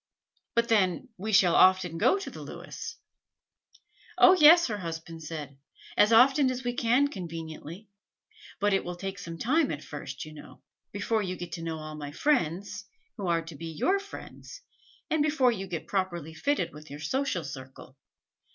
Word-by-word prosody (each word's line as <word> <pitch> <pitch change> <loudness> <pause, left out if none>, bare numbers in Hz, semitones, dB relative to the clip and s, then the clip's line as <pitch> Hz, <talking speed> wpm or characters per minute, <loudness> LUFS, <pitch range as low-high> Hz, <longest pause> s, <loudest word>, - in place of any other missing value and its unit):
But 235 0 +3
then 195 -6 +1
we 215 +3 -4
shall 190 -4 +5
often 185 -3 +4
go 390 - +4
to 395 - -6
the - - -9
Lewis?" 460 0 -8 1.2
"Oh, 365 - +8
yes," 340 0 +8
her 210 -3 -3
husband 165 -1 -6
said, 150 -3 -7 0.4
"as 210 - +5
often 265 +4 +6
as 255 0 -3
we 245 0 -1
can 245 +4 +3
conveniently. 165 - -8 0.7
But 205 +1 +2
it 195 - +2
will 175 0 -5
take 195 +2 -6
some 165 -3 -7
time 280 - +2
at 145 0 -4
first, 140 -2 -7
you 155 - -11
know, 150 - -13 0.3
before 215 +2 0
you 185 -2 -3
get 175 -1 -7
to 165 0 -5
know 165 -1 -3
all 155 0 -7
my 145 -1 -7
friends, 195 - 0 0.3
who 200 -4 -4
are 165 -1 +1
to 165 -1 -10
be 165 +3 -7
your 355 - +1
friends, 405 +4 -11 0.5
and 315 - +2
before 295 -4 +3
you 195 -4 -4
get 170 -3 -5
properly 175 -5 -2
fitted 285 - -1
with 150 +1 -12
your 145 +1 -8
social 185 - -1
circle. 130 -1 -10
185 Hz, 175 wpm, -28 LUFS, 160-245 Hz, 1.2 s, Oh